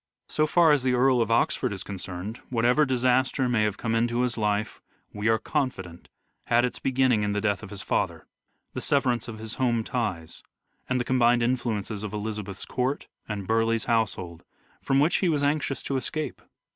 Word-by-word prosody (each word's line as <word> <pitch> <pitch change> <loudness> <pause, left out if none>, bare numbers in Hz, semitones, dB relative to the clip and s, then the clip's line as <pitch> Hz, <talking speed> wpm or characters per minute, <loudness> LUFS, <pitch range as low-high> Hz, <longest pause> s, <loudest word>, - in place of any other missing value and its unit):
So 155 0 +1
far 165 0 +5
as 145 -2 +4
the 125 -1 +1
Earl 125 0 +4
of 115 - 0
Oxford 115 -2 +1
is 95 -2 -5
concerned, 95 +2 -6
whatever 125 +5 +3
disaster 130 +1 +2
may 120 -3 +2
have 105 -2 0
come 115 -1 -2
into 120 +1 +1
his 125 -1 0
life, 105 -1 -1 0.3
we 105 +1 -2
are 110 0 +4
confident, 105 - -3 0.4
had 120 +1 +3
its 125 - -4
beginning 130 -4 +2
in 105 0 0
the 105 - 0
death 100 -2 0
of 110 - -9
his 100 -1 -7
father, - - -1 0.5
the - - -4
severance 125 -5 +1
of 115 -2 -7
his 110 0 -6
home 120 -3 +2
ties, 95 -10 -3 0.5
and 130 0 +1
the - - 0
combined 120 -2 +3
influences 115 -4 -1
of 105 -1 -5
Elizabeth's 105 -2 -5
court 130 +3 -2 0.2
and 100 -2 -4
Burleigh's 115 +1 +1
household, 95 -7 -1 0.4
from 135 - +2
which 155 +5 +3
he 185 - +1
was 150 -3 +1
anxious 145 -1 0
to 135 - -1
escape. 155 +3 -4
115 Hz, 185 wpm, -26 LUFS, 105-130 Hz, 0.5 s, far